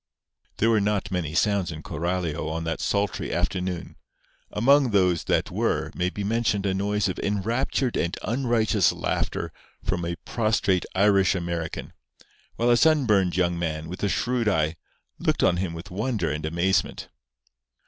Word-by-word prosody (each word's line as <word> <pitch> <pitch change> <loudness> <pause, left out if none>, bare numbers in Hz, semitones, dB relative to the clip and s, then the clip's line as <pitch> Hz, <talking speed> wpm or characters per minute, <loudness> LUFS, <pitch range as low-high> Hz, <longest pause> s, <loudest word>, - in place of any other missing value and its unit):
There 115 +2 +3
were 110 -2 +3
not 100 -1 0
many 85 -4 -2
sounds 100 -2 +2
in 80 0 -8
Coralio 85 -1 -2
on 80 +1 -3
that 80 0 -2
sultry 100 0 -1
afternoon. 90 -1 -2 0.5
Among 135 +4 +4
those 90 -5 +2
that - - +1
were - - 0
may 90 +1 0
be 100 +2 -5
mentioned 105 -1 0
a 95 - +1
noise 105 +2 0
of 95 - -3
enraptured 115 +5 0
and 85 +1 -1
unrighteous 115 -4 +2
laughter - - -2 0.3
from 90 -3 -1
a 85 0 -2
prostrate 110 -5 +1
Irish 100 -1 +4
American, 85 -2 -4 0.6
while 120 +1 +2
a 120 - +5
sunburned 115 - +3
young 85 -1 +1
man, 80 -2 -3
with 90 - -7
a 100 - +1
shrewd 120 +4 0
eye, 80 -4 +1 0.4
looked - - +1
on 90 - +4
him 90 -2 -2
with 85 +2 -9
wonder 105 - -1
and 75 +1 -3
amazement. 85 +4 0
95 Hz, 155 wpm, -25 LUFS, 85-110 Hz, 0.6 s, a